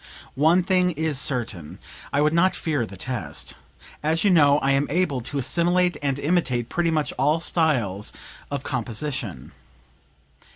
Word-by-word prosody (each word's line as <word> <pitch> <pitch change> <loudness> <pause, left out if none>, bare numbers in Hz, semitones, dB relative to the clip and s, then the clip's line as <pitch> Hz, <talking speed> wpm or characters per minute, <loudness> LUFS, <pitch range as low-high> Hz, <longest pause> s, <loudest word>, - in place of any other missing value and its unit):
One 160 +7 +3
thing 180 0 +2
is 160 -4 -1
certain; 115 - -2 0.3
I 145 - +2
would 150 +1 +3
not 175 +3 +3
fear 145 -8 -1
the 100 - -11
test. 95 - -5 0.5
As 160 +2 0
you 200 - +4
know 145 -4 +5
I 140 -2 +1
am 140 +1 +2
able 150 -5 0
to 140 +5 -4
assimilate 175 +6 +2
and 140 -2 0
imitate 140 -6 0
pretty 175 -1 0
much 155 -2 0
all 150 +5 +3
styles 125 - 0 0.4
of 140 -2 -4
composition." 120 - -4
145 Hz, 150 wpm, -24 LUFS, 125-165 Hz, 0.5 s, know